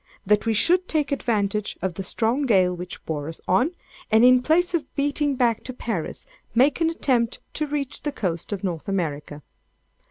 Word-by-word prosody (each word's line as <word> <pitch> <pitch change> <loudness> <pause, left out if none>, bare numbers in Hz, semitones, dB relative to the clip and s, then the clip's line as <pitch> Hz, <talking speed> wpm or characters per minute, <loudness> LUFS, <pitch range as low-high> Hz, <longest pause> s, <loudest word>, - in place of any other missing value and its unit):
that 210 +3 +2
we 225 - +3
should 360 - +3
take 300 -2 0
advantage 210 -6 -1
of 185 0 -2
the 195 - -5
strong 235 +8 0
gale 185 -5 +4
which 180 +1 -7
bore 150 -1 -3
us 165 - -9
on, 195 - +3 0.4
and 220 +2 +5
in 250 0 +6
place 345 +6 +2
of 335 -3 -2
beating 290 0 0
back 240 -3 +1
to 255 - -6
Paris, 225 -9 -4 0.3
make 270 +6 +3
an 325 - +3
attempt 250 -7 0
to 305 - -2
reach 285 -2 -3
the 295 - -2
coast 180 - -3
of 205 -1 -4
North 175 -5 -3
America. 150 -6 -3
230 Hz, 185 wpm, -24 LUFS, 185-285 Hz, 0.4 s, in